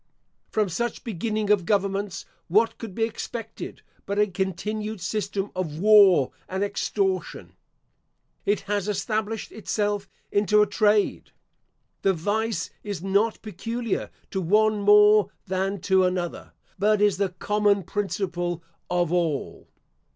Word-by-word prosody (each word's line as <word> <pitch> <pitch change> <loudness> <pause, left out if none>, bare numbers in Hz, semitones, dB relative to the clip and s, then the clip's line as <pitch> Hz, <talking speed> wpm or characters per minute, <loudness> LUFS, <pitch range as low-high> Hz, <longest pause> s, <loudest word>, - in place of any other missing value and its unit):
From 215 -2 +1
such 235 +6 -3
beginning 215 0 -1
of 205 -3 +4
governments, 200 0 -1 0.2
what 215 +6 +2
could 220 -5 -7
be 225 - 0
expected 225 0 -5 0.2
but 200 - -2
a 210 - +5
continued 210 +3 -3
system 200 +1 -2
of 165 -5 -3
war 195 -7 +6 0.2
and 190 +2 -1
extortion? 195 -2 -2 0.9
It 205 0 +1
has 205 0 -2
established 215 +2 -2
itself 205 -2 -2 0.2
into 210 +1 +4
a - - +2
trade. 210 0 +1 0.7
The 195 - +3
vice 205 +2 -1
is 200 -5 -5
not 200 +3 +1
peculiar 225 +2 -3 0.2
to 190 - -1
one 210 +4 +3
more 210 +1 +6 0.2
than 190 +1 -1
to 190 0 +3
another, 180 -1 -2 0.3
but 210 +1 +3
is 205 -2 +3
the 200 -1 +1
common 205 +2 +1
principle 175 -3 -2 0.3
of 175 -1 +1
all. 165 -6 -1
205 Hz, 125 wpm, -25 LUFS, 185-215 Hz, 0.9 s, war